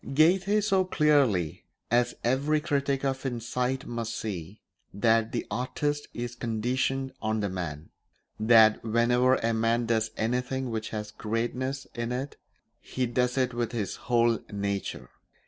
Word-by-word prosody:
Goethe 190 Hz, +7 st, +4 dB
saw 195 Hz, -2 st, +3 dB
clearly, 140 Hz, -, +2 dB, 0.3 s
as 120 Hz, +1 st, +2 dB
every 140 Hz, +5 st, +2 dB
critic 140 Hz, -3 st, 0 dB
of 135 Hz, -1 st, -1 dB
insight 125 Hz, +1 st, -2 dB
must 115 Hz, -1 st, -4 dB
see, 95 Hz, -1 st, -5 dB, 0.3 s
that 115 Hz, +2 st, +2 dB
the -, -, -2 dB
artist 145 Hz, +4 st, -2 dB
is 120 Hz, 0 st, -5 dB
conditioned 125 Hz, +3 st, -1 dB
on 110 Hz, 0 st, 0 dB
the 100 Hz, -, -1 dB
man; 80 Hz, -5 st, -5 dB, 0.5 s
that 110 Hz, -1 st, +6 dB
whenever 120 Hz, +3 st, +3 dB
a 115 Hz, -2 st, 0 dB
man 115 Hz, +1 st, +1 dB
does 110 Hz, -1 st, +1 dB
anything 125 Hz, +3 st, -1 dB
which 110 Hz, -1 st, -3 dB
has 105 Hz, -1 st, -5 dB
greatness 125 Hz, +5 st, -2 dB
in 120 Hz, 0 st, -3 dB
it 130 Hz, +3 st, -3 dB, 0.4 s
he 130 Hz, -, -2 dB
does 125 Hz, +2 st, 0 dB
it 125 Hz, -1 st, +1 dB
with 120 Hz, 0 st, -2 dB
his 105 Hz, -5 st, -3 dB
whole 120 Hz, -1 st, +3 dB
nature. 100 Hz, -1 st, -3 dB
120 Hz, 140 wpm, -28 LUFS, 110-130 Hz, 0.5 s, that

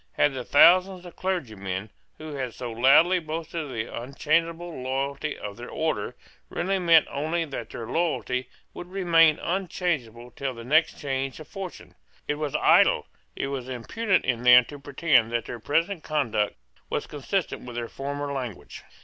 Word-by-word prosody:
Had 145 Hz, -, +2 dB
the 130 Hz, -2 st, -4 dB
thousands 180 Hz, +6 st, +5 dB
of 175 Hz, -, -11 dB
clergymen, 110 Hz, -, -3 dB, 0.3 s
who 155 Hz, -1 st, -8 dB
had 130 Hz, -4 st, -4 dB
so 120 Hz, -2 st, -5 dB
loudly 150 Hz, +10 st, +5 dB
boasted 165 Hz, +1 st, -4 dB
of 150 Hz, -, -7 dB
the 115 Hz, -3 st, -3 dB
unchangeable 160 Hz, +6 st, -2 dB
loyalty 135 Hz, +3 st, -2 dB
of 105 Hz, 0 st, -7 dB
their 120 Hz, +1 st, -8 dB
order, 160 Hz, 0 st, -2 dB, 0.3 s
really 195 Hz, +1 st, -1 dB
meant 170 Hz, -3 st, +5 dB
only 160 Hz, +4 st, -1 dB
that 125 Hz, -6 st, -6 dB
their 115 Hz, -, -6 dB
loyalty 130 Hz, -3 st, -1 dB, 0.2 s
would 175 Hz, -, -8 dB
remain 165 Hz, -5 st, +4 dB
unchangeable 160 Hz, -, -2 dB
till 130 Hz, +1 st, -4 dB
the 115 Hz, -, -9 dB
next 155 Hz, +6 st, +3 dB
change 135 Hz, -1 st, -3 dB
of 155 Hz, -, -10 dB
fortune? 195 Hz, -3 st, -8 dB, 0.3 s
It 150 Hz, -, -2 dB
was 150 Hz, -3 st, -2 dB
idle, -, -, +4 dB, 0.3 s
it 135 Hz, -, -3 dB
was 130 Hz, -2 st, -5 dB
impudent 185 Hz, -, 0 dB
in 120 Hz, -2 st, 0 dB
them 125 Hz, 0 st, +8 dB
to 145 Hz, -, -9 dB
pretend 140 Hz, -4 st, +2 dB
that 115 Hz, -1 st, 0 dB
their 120 Hz, -, -6 dB
present 165 Hz, -, 0 dB
conduct 125 Hz, -9 st, 0 dB, 0.3 s
was -, -, -2 dB
consistent 160 Hz, +6 st, -3 dB
with 120 Hz, -1 st, -8 dB
their 120 Hz, -1 st, -3 dB
former 140 Hz, +2 st, -4 dB
language. 125 Hz, -7 st, -6 dB
145 Hz, 165 wpm, -26 LUFS, 125-165 Hz, 0.3 s, them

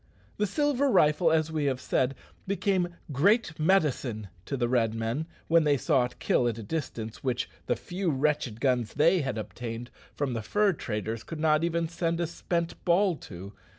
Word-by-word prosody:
The 210 Hz, -, +1 dB
silver 285 Hz, +4 st, +1 dB
rifle, 160 Hz, -4 st, +4 dB
as 160 Hz, 0 st, +2 dB
we 155 Hz, -2 st, -1 dB
have 130 Hz, -2 st, 0 dB
said, 130 Hz, +1 st, 0 dB, 0.3 s
became 190 Hz, -2 st, 0 dB, 0.2 s
"great 165 Hz, -, +2 dB
medicine" 140 Hz, -, +1 dB, 0.2 s
to 140 Hz, -, -2 dB
the 120 Hz, -1 st, +1 dB
Red 115 Hz, -3 st, +1 dB
men 115 Hz, +8 st, -2 dB, 0.2 s
when 165 Hz, 0 st, +5 dB
they 145 Hz, -2 st, +3 dB
saw 135 Hz, -2 st, +2 dB
it 125 Hz, -, -9 dB
kill 120 Hz, -, +2 dB
at 115 Hz, -2 st, -1 dB
a 115 Hz, -, -6 dB
distance 115 Hz, -4 st, -5 dB
which 125 Hz, -2 st, -1 dB, 0.2 s
the -, -, +2 dB
few 180 Hz, 0 st, -3 dB
wretched 145 Hz, -5 st, 0 dB
guns 125 Hz, -4 st, 0 dB
they 170 Hz, +4 st, +4 dB
had 130 Hz, -4 st, -2 dB
obtained 115 Hz, +2 st, -6 dB, 0.2 s
from 140 Hz, -3 st, -1 dB
the 115 Hz, -, -2 dB
fur 205 Hz, -, +2 dB
traders 110 Hz, -4 st, -4 dB
could 165 Hz, -, -7 dB
not 155 Hz, 0 st, +3 dB
even 170 Hz, 0 st, 0 dB
send 165 Hz, 0 st, -1 dB
a 170 Hz, -, +1 dB
spent 170 Hz, +1 st, -3 dB
ball 180 Hz, +1 st, +3 dB
to. 95 Hz, -1 st, -10 dB
150 Hz, 185 wpm, -28 LUFS, 120-170 Hz, 0.3 s, when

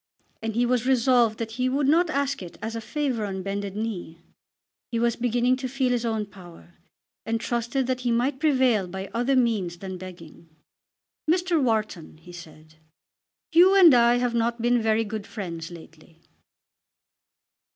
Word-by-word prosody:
And 225 Hz, -1 st, -4 dB
he 240 Hz, +1 st, +2 dB
was 250 Hz, 0 st, 0 dB
resolved 245 Hz, -3 st, +3 dB
that 225 Hz, -1 st, -4 dB
he 255 Hz, -, +2 dB
would 275 Hz, +1 st, 0 dB
not 330 Hz, +4 st, +3 dB
ask 280 Hz, -3 st, -1 dB
it 175 Hz, -2 st, -10 dB
as 225 Hz, +1 st, -5 dB
a 230 Hz, -, -4 dB
favour 255 Hz, 0 st, -2 dB
on 190 Hz, -2 st, -4 dB
bended 200 Hz, 0 st, -4 dB
knee. 210 Hz, -7 st, -5 dB, 0.7 s
He 235 Hz, -, -1 dB
was 235 Hz, 0 st, +1 dB
beginning 245 Hz, +1 st, +1 dB
to 260 Hz, -1 st, -4 dB
feel 260 Hz, -1 st, 0 dB
his 240 Hz, -1 st, 0 dB
own 220 Hz, -2 st, -1 dB
power, 175 Hz, -, -15 dB, 0.5 s
and 225 Hz, 0 st, -2 dB
trusted 240 Hz, +3 st, -1 dB
that 255 Hz, 0 st, -1 dB
he 245 Hz, -1 st, -2 dB
might 250 Hz, +4 st, 0 dB
prevail 260 Hz, -, +2 dB
by 190 Hz, +2 st, -7 dB
other 245 Hz, +4 st, +1 dB
means 215 Hz, -9 st, 0 dB
than 185 Hz, 0 st, -7 dB
begging. 170 Hz, -3 st, -12 dB, 0.8 s
"Mr. 350 Hz, -1 st, +2 dB
Wharton," 215 Hz, -, -2 dB
he 165 Hz, +3 st, -14 dB
said, 155 Hz, -2 st, -13 dB, 0.8 s
"you 365 Hz, +4 st, +6 dB
and 355 Hz, -6 st, +8 dB
I 240 Hz, 0 st, +5 dB
have 245 Hz, -1 st, 0 dB
not 235 Hz, 0 st, 0 dB
been 240 Hz, +1 st, +2 dB
very 220 Hz, 0 st, +2 dB
good 215 Hz, -1 st, -6 dB
friends 170 Hz, -6 st, -6 dB
lately." 165 Hz, -1 st, -15 dB
230 Hz, 165 wpm, -25 LUFS, 195-255 Hz, 0.8 s, and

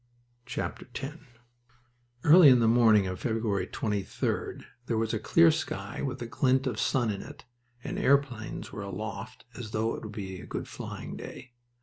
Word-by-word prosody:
X -, -, -7 dB, 1.7 s
Early 165 Hz, 0 st, +9 dB
in 125 Hz, -, +7 dB
the 115 Hz, -, +3 dB
morning 110 Hz, -3 st, +5 dB
of 95 Hz, -1 st, -4 dB
February 110 Hz, -5 st, -1 dB
23d 105 Hz, -3 st, -2 dB, 0.2 s
there 115 Hz, -, 0 dB
was 110 Hz, 0 st, 0 dB
a 110 Hz, -, 0 dB
clear 165 Hz, +8 st, +5 dB
sky 100 Hz, -11 st, -4 dB
with 130 Hz, -2 st, -3 dB
a -, -, -4 dB
glint 130 Hz, +2 st, +2 dB
of 120 Hz, -5 st, -2 dB
sun 120 Hz, -4 st, +1 dB
in 100 Hz, -, -4 dB
it, -, -, -11 dB, 0.4 s
and -, -, -4 dB
airplanes 135 Hz, -5 st, +1 dB
were 105 Hz, -, -6 dB
aloft 105 Hz, +3 st, -6 dB
as 115 Hz, -1 st, -7 dB
though 110 Hz, +1 st, 0 dB
it -, -, -6 dB
would 110 Hz, -, -7 dB
be 95 Hz, -4 st, -6 dB
a -, -, -11 dB
good -, -, -4 dB
flying -, -, -7 dB
day. 125 Hz, -, -9 dB
110 Hz, 165 wpm, -29 LUFS, 105-130 Hz, 1.7 s, Early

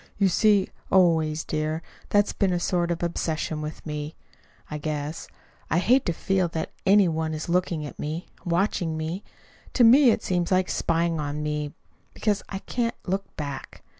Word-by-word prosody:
You 195 Hz, -2 st, +4 dB
see, 205 Hz, 0 st, +4 dB, 0.2 s
always, 160 Hz, -4 st, +3 dB
dear, 155 Hz, +1 st, -2 dB, 0.3 s
that's 205 Hz, 0 st, +3 dB
been 195 Hz, -2 st, +1 dB
a 175 Hz, -, +1 dB
sort 175 Hz, 0 st, 0 dB
of 170 Hz, 0 st, -2 dB
obsession 160 Hz, -2 st, -2 dB
with 150 Hz, 0 st, -7 dB
me, 150 Hz, 0 st, -4 dB, 0.6 s
I 150 Hz, -, -3 dB
guess. 150 Hz, +1 st, -4 dB, 0.4 s
I 165 Hz, -, +2 dB
hate 245 Hz, +9 st, +3 dB
to -, -, +3 dB
feel 185 Hz, +2 st, +1 dB
that 160 Hz, -1 st, -4 dB, 0.2 s
any 200 Hz, -1 st, +6 dB
one 160 Hz, -1 st, -1 dB
is 155 Hz, -, -5 dB
looking 170 Hz, -3 st, 0 dB
at 145 Hz, -, -9 dB
me 155 Hz, +4 st, -3 dB, 0.2 s
watching 175 Hz, -2 st, 0 dB
me. 165 Hz, +5 st, -3 dB, 0.5 s
To 250 Hz, -, +4 dB
me 250 Hz, +3 st, +8 dB
it 225 Hz, -, +1 dB
seems 175 Hz, -1 st, 0 dB
like 185 Hz, 0 st, +3 dB
spying 165 Hz, 0 st, 0 dB
on 150 Hz, 0 st, -3 dB
me 150 Hz, -1 st, -3 dB, 0.4 s
because 210 Hz, -2 st, 0 dB
I -, -, -5 dB
I -, -, -2 dB
can't 235 Hz, -1 st, -1 dB
look 195 Hz, +1 st, -3 dB
back. 140 Hz, -3 st, -6 dB
170 Hz, 175 wpm, -26 LUFS, 155-190 Hz, 0.6 s, me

